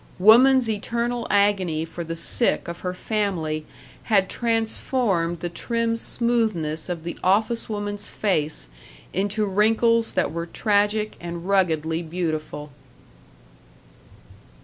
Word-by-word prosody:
Woman's 245 +6 +6
eternal 235 +2 -2
agony 190 -6 +2
for 170 +1 -7
the 165 0 -5
sick 170 +8 +2
of 170 0 -6
her 180 0 -4
family 180 -8 -2 0.4
had 195 -4 +2
transformed 225 -6 0
the 175 - -2
trim 230 +6 -1
smoothness 220 -11 0
of 170 -3 -4
the 170 - -6
office 220 +6 +1
woman's 205 -1 -3
face 155 -7 -1 0.5
into 205 +3 0
wrinkles 225 +3 +2
that - - 0
were 170 0 -4
tragic 210 +3 +1
and 170 +1 -6
ruggedly 165 -4 +1
beautiful. 155 -3 -4
200 Hz, 110 wpm, -23 LUFS, 170-225 Hz, 0.5 s, Woman's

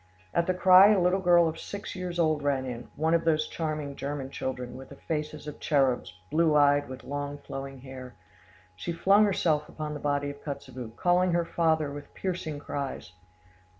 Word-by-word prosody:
At 170 - +1
the 185 - +1
cry 185 +1 +8
a 205 - +4
little 180 +2 +2
girl 175 -2 +5
of 160 0 -4
six 200 -1 -7
years 180 -1 -4
old 155 -3 +2
ran 140 -2 0
in, 125 -1 -6
one 160 +2 +1
of 165 0 +3
those 155 -1 +2
charming 155 -3 -4
German 140 -1 -4
children, 125 -2 -4
with 135 0 -10
the 140 - -11
faces 150 0 -4
of 150 - -8
cherubs, 135 - +1 0.2
blue 160 -1 +3
eyed, 145 -1 +4
with 130 0 -8
long 145 0 -4
flowing 135 -2 -7
hair. 130 -2 -10 0.6
She 170 - -4
flung 195 +5 +5
herself 160 -6 +1
upon 155 -1 -5
the 150 - -5
body 145 0 -1
of 140 - -14
Kotzebue, 130 -5 -7
calling 180 +2 +2
her 170 0 +1
father 160 -3 +1
with 145 0 -10
piercing 175 -5 -3
cries. 140 -5 -5
150 Hz, 185 wpm, -28 LUFS, 140-170 Hz, 0.6 s, cry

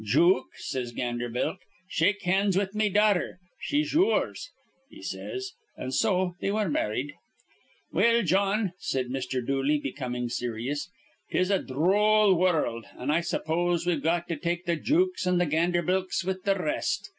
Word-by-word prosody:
'Jook,' 170 - +3
says 125 -2 -4
Ganderbilk, 120 +7 -2 0.3
'shake 205 +4 +1
hands 190 +1 +2
with 195 0 0
me 215 0 +1
daughther. 205 -2 +2 0.2
She's 295 +1 -1
your's,' 390 +8 +1 0.4
he 310 +2 -13
says. 385 0 -5 0.3
An' 130 - -5
so 185 +2 +1
they - - 0
were 210 -1 0
marrid. 135 +1 -1 0.8
"Well, 230 +5 +3
Jawn," 195 +2 +1
said 130 -2 -2
Mr. 130 -1 -3
Dooley, 135 +3 +1
becoming 125 -3 -4
serious, 120 +6 -3 0.4
"'tis 185 +2 +1
a 195 - +3
dhroll 200 +8 +3
wurruld, 160 -10 +1
an' 130 +4 -1
I 165 +3 +2
suppose 175 0 0
we've 170 -5 +1
got 170 +3 0
to 165 - -2
take 175 +3 -2
th' 170 -2 -1
jooks 355 - +1
an' 180 0 +3
th' 175 -4 +1
Ganderbilks 175 +3 +1
with 190 0 -3
the 195 -1 +3
r 180 - -4
rest. 150 - -1
175 Hz, 155 wpm, -27 LUFS, 140-200 Hz, 0.8 s, Jook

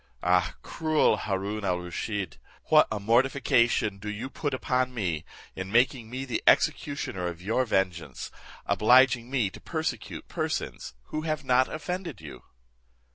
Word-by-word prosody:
Ah! 90 0 +2
cruel 155 -1 +2
Haroon 100 +2 -3
al 90 -2 +1
Rusheed! 90 - -4 0.3
what - - +6
a 110 - -1
mortification 115 -2 +2
do 105 - -6
you 110 +6 -5
put 145 +2 -2
upon 130 -1 0
me, 85 -8 -1 0.3
in 95 +1 -5
making 120 0 +2
me 130 +2 -4
the 125 - -2
executioner 95 -11 +2
of 85 -1 -5
your 110 +8 0
vengeance, 90 - -2 0.3
obliging 125 +1 +4
me 125 -8 0
to - - -12
persecute - - -4
persons - - -3
who 155 - -3
have 155 -1 -2
not 130 0 +3
offended 180 +4 -4
you." 75 -3 -10
115 Hz, 140 wpm, -27 LUFS, 95-130 Hz, 0.3 s, what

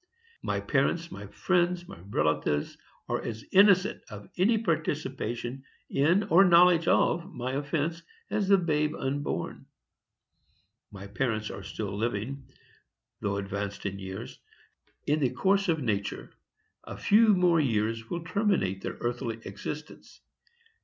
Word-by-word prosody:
My - - -1
parents, - - 0
my - - -8
friends, 175 -1 0
my - - -11
relatives, 75 -3 0 0.3
are - - -1
as 110 -1 -6
innocent 195 0 +5
of 105 -2 -10
any 215 +6 +3
participation 135 - -2 0.3
in 170 +9 +3
or 195 -1 +5
knowledge 175 -2 +6
of 175 +3 +2
my 125 -2 -4
offence 150 +4 -2 0.3
as 205 -2 0
the 200 0 +6
babe 150 -4 0
unborn. 140 +2 -3 1.2
My 100 -1 -9
parents 110 0 -2
are - - -7
still 100 +1 -5
living, 120 +5 -3 0.7
though 100 -1 -1
advanced 100 +1 -4
in 100 0 -3
years, 95 0 -7 0.7
and, 150 - +3
in - - -2
the 135 -4 +2
course 195 +2 +2
of 160 -4 +1
nature, 100 -4 -2 0.5
a - - -8
few 215 0 +5
more 175 -2 +4
years 115 -4 0
will 170 -1 -3
terminate 180 - 0
their - - -5
earthly 120 -1 -3
existence. 150 +10 -8
140 Hz, 130 wpm, -28 LUFS, 105-175 Hz, 1.2 s, knowledge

